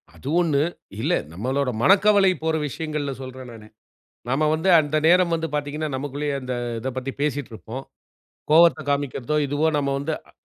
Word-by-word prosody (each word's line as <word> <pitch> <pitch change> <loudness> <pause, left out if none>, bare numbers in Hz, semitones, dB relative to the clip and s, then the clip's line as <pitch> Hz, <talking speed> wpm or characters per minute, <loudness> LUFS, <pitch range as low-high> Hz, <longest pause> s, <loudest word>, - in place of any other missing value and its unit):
அது - - -11
ஒண்ணு. 155 -5 +2 0.4
இல்ல, 155 +8 +1 0.2
நம்மளோட 130 +8 -1
மனக்கவலை 200 +1 +5
போற 160 0 +1
விஷயங்கள்ல 150 -1 -4
சொல்றேன் 130 -1 -9
நானு. 110 -2 -12 0.6
நாம 140 +5 +1
வந்து 160 +4 0
அந்த 155 0 0
நேரம் 175 0 +4
வந்து 165 0 -2
பார்த்தீங்கன்னா, 150 +1 -2
நமக்குள்ளேயே 145 +1 -3
அந்த 130 0 -4 0.3
இதப் 130 +2 -5
பத்தி 130 +1 -3
பேசிட்ருப்போம். 135 -3 -4 0.7
கோவத்த 165 +1 +6
காண்பிக்கிறதோ! 140 0 -1
இதுவோ! 145 +3 0
நம்ம 140 -1 0
வந்து 145 +3 -3 0.2
அ - - -17
145 Hz, 150 wpm, -23 LUFS, 130-160 Hz, 0.7 s, கோவத்த